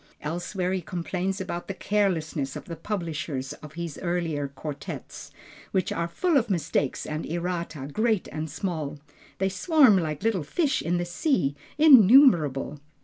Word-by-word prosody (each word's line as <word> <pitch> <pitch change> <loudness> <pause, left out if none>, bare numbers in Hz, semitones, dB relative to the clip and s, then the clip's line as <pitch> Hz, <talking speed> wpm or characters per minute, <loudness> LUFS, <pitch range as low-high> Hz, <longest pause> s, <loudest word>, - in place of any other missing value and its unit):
Elsewhere 175 +4 -2
he 190 - -1
complains 180 +3 -3
about 180 -2 -5
the 195 - -4
carelessness 170 -9 -1
of - - -7
the 170 - -6
publishers 160 -7 -4
of 150 -1 -11
his 170 -2 -5
earlier 170 -5 -1
quartets, 140 +1 -7 0.4
which 190 -2 0
are 170 - -1
"full 330 - +1
of 235 -4 +1
mistakes 150 -6 -1
and 155 +1 -4
errata 170 -4 -3
great 215 +5 0
and 155 0 -4
small. 155 -3 -3 0.4
They 190 0 +1
swarm 235 - +5
like 155 -1 -3 0.2
fish 285 - 0
in 175 +2 0
the 175 - -1
sea, 175 - 0 0.2
innumerable." 220 - +6
175 Hz, 145 wpm, -26 LUFS, 155-195 Hz, 0.4 s, innumerable